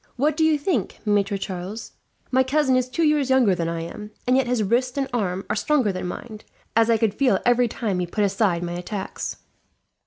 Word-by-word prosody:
"What 290 +4 +1
do 320 - +1
you 315 -1 +4
think, 285 - -1
Maitre 205 -1 +1
Charles? 190 +3 -6 0.4
My 260 0 +4
cousin 265 0 +2
is 255 0 +1
two 330 +6 -1
years 300 -3 +2
younger 255 -7 +4
than 170 -2 -1
I 165 0 -3
am, 210 +5 -7 0.2
and 250 - +3
yet 265 -2 +2
his 245 -3 +1
wrist 245 +6 0
and 275 -1 0
arm 195 -5 -1
are - - -1
stronger 280 -9 +2
than 185 -1 -4
mine, 215 +4 -7 0.4
as 225 0 +4
I 230 - +4
could 220 -3 +1
feel 250 -4 +2
every 245 0 +4
time 215 -5 -2
he 180 - -1
put 210 +4 -1
aside 190 -3 +1
my 175 0 -3
attacks." 190 +3 -5
225 Hz, 215 wpm, -23 LUFS, 195-260 Hz, 0.4 s, you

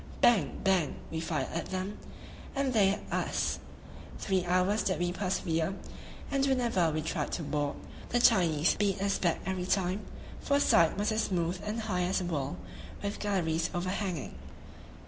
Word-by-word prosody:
Bang! 215 -11 +3
bang! 185 -6 +2 0.2
we 160 - -2
fired 160 -1 -2
at 165 - -2
them, 190 +2 -4 0.6
and 275 -1 0
they 205 -4 +5
at 200 - -1
us; - - 0 0.6
three 190 -3 0
hours 185 +4 +2
did 185 - 0
we 175 0 0
persevere, 180 -2 -1 0.6
and 275 -1 +2
whenever 240 -10 +2
we 155 0 -2
tried - - -2
to 170 - -2
board, 145 -1 -1 0.3
the 245 - +2
Chinese 165 -7 +4
beat 200 -2 0
us 200 0 0
back 170 -3 +1
every 185 -1 -2
time, 190 +1 +1 0.4
for 280 - +1
her - - +4
side 165 - +4
was 210 +2 +1
as 215 +1 +1
smooth 175 -1 -1
and 210 +1 -3
as 225 - -3
high 180 -4 0
as 180 +2 +1
a 185 - -3
wall, 140 - -2 0.5
with 200 0 -3
galleries 170 -5 0
overhanging. 185 -2 -2
185 Hz, 170 wpm, -30 LUFS, 170-205 Hz, 0.6 s, they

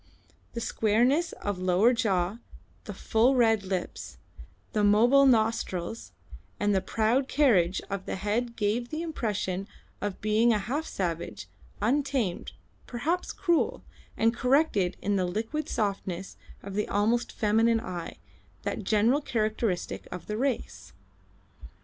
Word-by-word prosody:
The 235 - -4
squareness 245 +11 +2
of 205 -3 -4
lower 185 +6 +3
jaw, 200 -2 0 0.5
the - - -6
full 240 +4 +2
red 225 -4 +4
lips, 185 -2 -4 0.6
the 210 - +1
mobile 240 +7 +5
nostrils, 225 -4 0 0.5
and 205 0 +2
the 190 - +2
proud 230 +7 +1
carriage 200 - +3
of 195 -2 -5
the - - -2
head 220 +5 -2
gave 230 +3 -1
the 315 +2 -3
impression 205 - -2 0.3
of 205 -1 -2
a - - -21
being 215 +3 +2
half 250 +10 -2
savage, 170 - -4 0.4
untamed, 260 -5 0 0.3
perhaps 315 +9 -2
cruel, 345 -3 0 0.3
and 225 +1 +3
corrected 250 - +2
the 195 -2 +1
liquid 225 +12 -3
softness 195 -3 -3 0.3
of 200 - -7
the 210 +1 -1
almost 230 +4 +1
feminine 225 +2 +2
eye, 180 -6 -6 0.5
that - - -3
general 220 +8 +3
characteristic 220 -6 -2
of 180 - -7
the 210 - -4
race. 260 +2 -3
220 Hz, 125 wpm, -28 LUFS, 195-245 Hz, 0.6 s, mobile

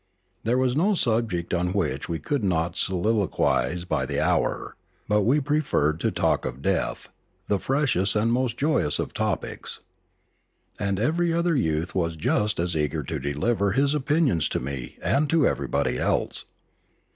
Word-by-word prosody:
There 120 +3 +1
was 130 -1 +1
no 195 +7 +3
subject 110 - 0
on 90 +1 0
which 75 -9 -1
we 85 - -1
could 130 - -2
not 85 -2 0
soliloquise 90 - +1
by - - -1
the - - -1
hour, - - 0 0.3
but 105 0 +3
we 125 +9 +3
preferred 135 - +1
to - - +1
talk - - +1
of 65 +3 -5
death, - - -1 0.4
the 100 - +1
freshest 130 -9 +1
and 115 +2 +2
most 125 -2 0
joyous 140 - +1
of - - -3
topics. - - -3 1.0
And 100 -2 -1
every 165 +9 +1
other 170 0 +1
youth 80 - 0
was 85 -3 -1
just 105 +6 0
as 85 0 0
eager 75 0 -1
to 80 +3 -4
deliver 95 - 0
his 140 +4 +2
opinions 145 - +1
to - - -1
me 65 -2 -6
and 145 +1 +2
to 160 -2 +3
everybody - - -1
else. - - 0
100 Hz, 155 wpm, -25 LUFS, 80-135 Hz, 1.0 s, no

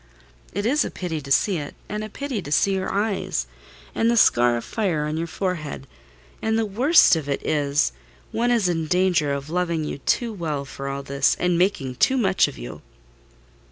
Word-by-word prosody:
"It 205 +2 -3
is 290 +6 +3
a - - -3
pity 165 -4 -4
to 140 -1 -9
see 180 +5 +3
it; 145 - -7
and 210 +1 -4
a 215 - -6
pity 265 -2 -4
to 145 - -9
see 195 +5 +3
your 190 -1 -2
eyes—and 190 - -2
the 235 - +2
scar 120 - +4
of 115 - -6
fire 180 -9 -1
on 150 +1 -2
your 165 +1 -2
forehead: 165 -6 -4 0.6
and 220 0 +1
the 225 - +1
worst 245 - +5
of 150 -3 -4
it 140 - -2
is, 145 -1 +1 0.4
one 235 +2 0
is 230 -6 +2
in 165 -3 -1
danger 180 -4 +2
of 140 +2 -4
loving 170 -2 0
you 150 - -5
too 230 - 0
well 155 -7 -3
for 135 0 -7
all 140 0 -4
this; 140 0 +1
and 180 -1 +1
making 170 -8 0
too 265 - +3
much 190 -6 +3
of - - -9
you." - - -8
170 Hz, 195 wpm, -23 LUFS, 140-205 Hz, 0.6 s, worst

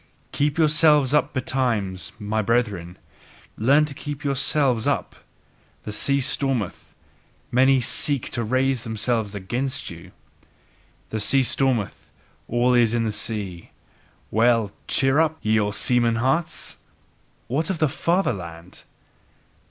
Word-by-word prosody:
Keep 145 +1 0
yourselves 150 -3 +4
up 150 -1 +2
betimes, 115 - -1
my 110 0 -1
brethren, 100 -6 -1 0.6
learn 140 +7 +4
to 150 - -5
keep 145 +1 -7
yourselves 135 -3 +1
up! - - -1 0.7
The 105 - -5
sea 140 +6 +1
stormeth: 130 -6 -2 0.6
many 130 +1 +4
seek 140 +1 -1
to 120 - -2
raise 130 +1 0
themselves 110 -1 -2
again 120 +8 -2
by 130 -9 -4
you. 85 +2 -13 1.0
The 110 - -3
sea 135 +5 +3
stormeth: 125 -5 -1 0.4
all 120 +2 +2
is 120 -2 +3
in 115 - +1
the 110 - -1
sea. 100 -5 -4 0.6
Well! 115 -1 +3 0.2
Cheer 135 +2 +2
up! 160 -1 +2
Ye 110 0 +2
old 105 -1 -1
seaman 120 -2 +2
hearts! 135 +8 -1 0.7
What 150 +8 -1
of 190 - -1 0.2
fatherland! 90 - -2
120 Hz, 120 wpm, -23 LUFS, 105-140 Hz, 1.0 s, yourselves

